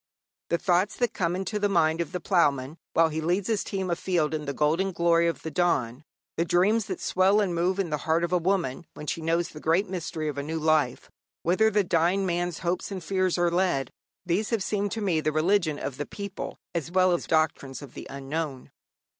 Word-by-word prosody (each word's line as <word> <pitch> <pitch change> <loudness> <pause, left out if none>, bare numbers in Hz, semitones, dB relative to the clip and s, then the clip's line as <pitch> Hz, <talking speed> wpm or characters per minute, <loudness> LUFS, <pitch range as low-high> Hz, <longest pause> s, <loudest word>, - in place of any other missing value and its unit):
The 170 - +2
thoughts 180 +3 +1
that 245 -2 0
come 175 -1 0
into 195 +3 -2
the 205 0 +1
mind 165 -3 +2
of 170 - -4
the 180 - -3
ploughman 150 -6 +1
while 165 0 +4
he 160 +1 -3
leads 180 +4 0
his 220 -3 0
team 190 -3 -3
afield 170 -3 0
in 155 -1 -3
the 140 - -2
golden 165 +7 +1
glory 170 0 +3
of 170 - -3
the 160 - -4
dawn; 140 -6 0 0.3
the 165 - +2
dreams 195 +6 +2
that 185 - -4
swell 190 +3 +3
and 195 -4 +1
move 175 +3 +1
in 190 -5 -1
the 150 - +1
heart 165 +1 +1
of 170 - -1
the 180 - +3
woman 170 -5 -1
when 150 - -8
she 165 - -3
knows 165 +1 0
the 155 - -10
great 170 +6 +2
mystery 170 -4 -4
of 145 -2 -3
a - - -1
new 160 +3 -3
life; 155 -5 +1 0.3
whither 185 +6 +3
the 210 -1 +2
dying 175 +2 +2
man's 175 -1 -1
hopes 175 +3 -1
and 190 -3 -5
fears 185 0 +1
are 175 -1 +2
led 170 -8 +1 0.3
these 185 +5 0
have 225 -5 0
seemed 205 -1 -1
to 225 - -3
me 175 -6 +1
the 155 - 0
religion 160 0 +2
of 135 -3 -5
the 145 - -4
people 200 -1 -6 0.2
as 165 -3 -2
well 185 +1 +3
as 175 - -1
doctrines 150 -4 0
of 135 - -11
the - - -8
unknown. 140 0 -4
170 Hz, 220 wpm, -27 LUFS, 155-190 Hz, 0.3 s, while